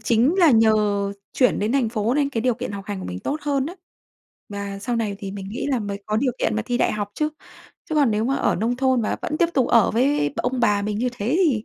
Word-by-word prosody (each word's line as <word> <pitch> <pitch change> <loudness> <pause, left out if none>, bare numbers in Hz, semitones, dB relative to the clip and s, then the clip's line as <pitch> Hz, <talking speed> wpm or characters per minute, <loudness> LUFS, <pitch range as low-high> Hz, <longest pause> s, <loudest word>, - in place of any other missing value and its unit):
chính 235 +7 +2
là 340 -4 +6
nhờ 225 -2 +5 0.6
chuyển 250 -2 +2
đến 210 +3 0
thành 265 -4 +2
phố 225 +1 -1
nên 285 -1 +2
cái 230 - -2
điều 250 +1 +1
kiện 245 -1 -5
học 200 -1 -6
hành 205 -2 -4
của - - -7
mình 90 0 -5
tốt 285 - -2
hơn 280 -2 0
á, 340 - -6 0.7
và 200 -1 -5
sau 235 +4 -2
này 215 -3 -2
thì 195 -1 -6
mình 195 -1 -7
nghĩ 225 +7 -4
là 260 - +1
mới 200 -2 -5
có 215 - 0
điều 250 +2 +1
kiện 220 - 0
mà 220 - 0
thi 245 -1 0
đại - - +2
học 205 -1 -3
chứ. 305 - 0 0.6
Chứ 315 - -2
còn 285 -5 +4
nếu 215 +1 0
mà 265 +3 +1
ở - - +1
nông 230 +5 0
thôn 260 -2 +2
và 215 - -1
vẫn 305 - -2
tiếp 340 - +3
tục 260 - +2
ở 230 -3 +4
với 250 - +2
b - - 0
ông 250 0 -1
bà 205 -4 +2
mình 210 0 -2
như 250 +2 +1
thế 245 +5 -1
thì 235 -10 +1
230 Hz, 280 wpm, -23 LUFS, 210-260 Hz, 0.7 s, là